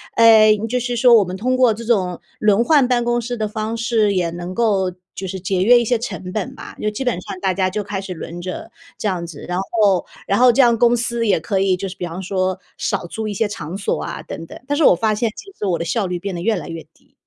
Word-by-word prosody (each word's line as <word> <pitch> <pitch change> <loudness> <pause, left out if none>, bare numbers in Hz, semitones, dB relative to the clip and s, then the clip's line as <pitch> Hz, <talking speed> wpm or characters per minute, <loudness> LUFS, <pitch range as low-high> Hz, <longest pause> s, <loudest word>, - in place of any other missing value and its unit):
呃， 220 -2 +7
就 250 +2 0
是 245 0 -2
说 245 +1 +6
我 210 - +6
们 185 +1 -6
通 255 +5 0
过 250 -3 +5
这 230 +2 -8
种 185 -7 +1 0.2
轮 210 +1 +3
换 280 -1 +4
办 245 -2 +1
公 240 0 +1
室 240 +1 -4
的 215 - -1
方 215 +2 -3
式， 225 -3 +1
也 175 -2 +1
能 175 +2 -6
够 200 -5 +1 0.2
就 190 - -5
是 190 +1 -5
节 185 0 -1
约 240 +4 +7
一 235 - -1
些 240 +2 +2
成 185 -5 -6
本 215 -4 -3
吧。” - - -10
就 215 - +1
基 210 +6 -4
本 245 - +1
上 185 - -7
大 190 -1 0
家 185 0 +1
就 205 +2 -3
开 195 -1 -4
始 190 -1 -6
轮 170 +2 -7
着， 185 +1 -6 0.3
这 215 - -2
样 180 -3 -2
子。 165 -4 -9
然 180 0 -2
后 195 -3 +1 0.2
然 200 +4 +2
后 250 -1 +7
这 270 +4 +4
样 235 -2 +4
公 240 +1 +4
司 235 0 -1
也 190 -5 +3
可 190 +4 -1
以 190 -1 +2
就 195 - -4
是 185 - -9
比 175 - -4
方 175 +2 -6
说 185 0 -1 0.2
少 - - -2
租 220 +4 -4
一 205 - -3
些 215 +2 0
场 185 -3 -6
所 200 - -2
啊 - - -5
等 165 - -7
等， - - -11
但 290 0 0
是 320 - +2
我 180 - +7
发 215 +4 +1
现 225 0 0
其 395 - -11
实 205 - -3
我 175 -3 +1
的 - - -1
效 200 +4 0
率 180 -1 -3
变 195 +1 -4
得 170 - -4
越 220 +4 +1
来 - - -6
越 165 -2 -6
低。 - - -31
205 Hz, 300 characters per minute, -20 LUFS, 185-235 Hz, 0.3 s, 呃